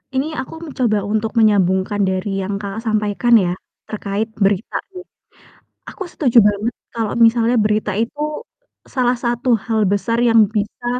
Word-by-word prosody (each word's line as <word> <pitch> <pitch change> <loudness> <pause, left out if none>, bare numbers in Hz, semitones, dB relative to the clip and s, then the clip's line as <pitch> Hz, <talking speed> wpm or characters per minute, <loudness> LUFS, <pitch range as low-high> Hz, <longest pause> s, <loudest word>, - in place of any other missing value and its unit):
Ini 270 +3 0
aku 260 - -10
mencoba 250 -8 0
untuk 220 +1 -1
menyambungkan 200 -1 +2
dari 190 +1 -1
yang 200 +1 -3
Kakak 205 +2 -6
sampaikan 215 +2 0
ya, 180 -2 0 0.3
terkait 210 0 -3
berita 200 0 0 0.2
nih. 365 -1 -10 0.9
Aku 385 - -6
setuju 255 -8 0
banget 210 +3 +1 0.2
kalau 225 -3 -2
misalnya 230 +1 +3
berita 210 -1 0
itu 230 +8 -3 0.7
salah 250 -1 +2
satu 240 0 0
hal 220 -3 +1
besar 205 +4 0
yang 225 -3 +5
bisa 215 +2 -4
215 Hz, 140 wpm, -19 LUFS, 200-235 Hz, 0.9 s, yang